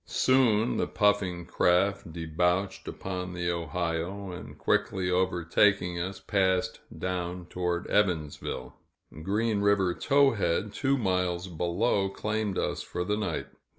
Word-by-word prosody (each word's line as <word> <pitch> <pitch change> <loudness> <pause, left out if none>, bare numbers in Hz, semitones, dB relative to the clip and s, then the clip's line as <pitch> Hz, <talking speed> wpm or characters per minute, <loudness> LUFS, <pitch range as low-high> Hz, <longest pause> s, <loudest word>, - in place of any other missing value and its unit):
Soon, 120 -4 +3
the - - 0
puffing 95 -5 +1
craft 90 +1 +1
debouched 90 +4 -1
upon 90 -1 -5
the 85 0 -1
Ohio, 85 +3 -3
and, 90 - -9
quickly 90 -2 0
overtaking 90 0 +2
us, 95 +3 -4
passed 95 +2 +1 0.2
down 90 +1 -3
toward 90 0 -2
Evansville. 90 -8 -1 0.5
Green 105 +4 0
River 100 -3 +3
Towhead, 110 -9 +2
two 140 0 +1
miles 90 -4 0
below, 95 +4 0
claimed 105 0 -2
us - - -1
for 90 - -4
the 105 +3 0
night. 100 -7 -2
90 Hz, 115 wpm, -28 LUFS, 85-105 Hz, 0.5 s, Soon